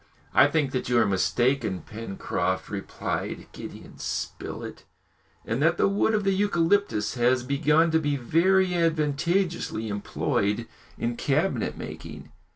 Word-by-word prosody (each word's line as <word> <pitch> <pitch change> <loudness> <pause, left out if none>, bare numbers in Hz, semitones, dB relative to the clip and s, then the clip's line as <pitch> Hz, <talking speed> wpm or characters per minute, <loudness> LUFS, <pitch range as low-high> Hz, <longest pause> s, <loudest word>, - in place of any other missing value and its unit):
"I 130 - +7
think 145 -2 0
that 130 -2 -2
you 125 - +3
are 115 - +5
mistaken, 110 0 +1
Pencroft," 95 -3 -3
replied 100 -1 -4
Gideon - - -10
Spilett, - - -5 0.6
"and 115 +5 -1
that 165 +2 +3
the - - +4
wood 205 +2 +2
of 210 - 0
the 195 0 +2
eucalyptus 190 - +1
has 125 0 +2
begun 150 +5 +3
to 160 - +4
be 145 -2 0
very 180 +8 +3
advantageously 165 - 0
employed 105 +2 -1 0.3
in 120 0 -2
cabinet 155 +7 0
making." - - -8
140 Hz, 130 wpm, -26 LUFS, 115-170 Hz, 0.6 s, I